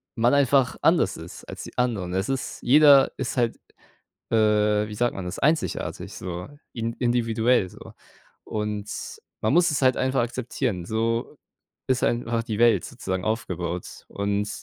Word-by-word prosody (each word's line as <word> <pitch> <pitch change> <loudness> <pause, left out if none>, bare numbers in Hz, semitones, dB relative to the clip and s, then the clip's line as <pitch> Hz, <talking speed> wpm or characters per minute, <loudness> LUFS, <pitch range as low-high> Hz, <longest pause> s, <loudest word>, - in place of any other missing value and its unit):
man 120 +2 +3
einfach 140 -2 +3
anders - - +3
ist - - -10
als - - -8
die - - -11
anderen. 110 -8 -1
Es 95 +6 -1
ist 135 0 -3
jeder 140 +1 +7
ist 130 - -3
halt, 120 -2 +1 0.7
äh, 105 -1 +3
wie 105 - -7
sagt 120 +2 +1
man 95 - -5
das, 90 - -5
einzigartig, 155 +3 -1
so, 90 0 -6 0.3
in 115 -1 -3
individuell, 120 -3 +1
so - - -13 0.5
und 105 -1 -4 0.5
man 110 - +2
muss 175 0 +4
es 145 -2 -1
halt 130 -1 +4
einfach 130 0 +1
akzeptieren, 120 -5 -3
so 115 +1 -1 0.5
ist 130 -1 +2
einfach 120 -1 0
die 110 -2 -4
Welt 120 0 +4
sozusagen 95 -7 -4
aufgebaut 90 -6 -4
und 100 +1 -1
115 Hz, 150 wpm, -25 LUFS, 105-125 Hz, 0.7 s, jeder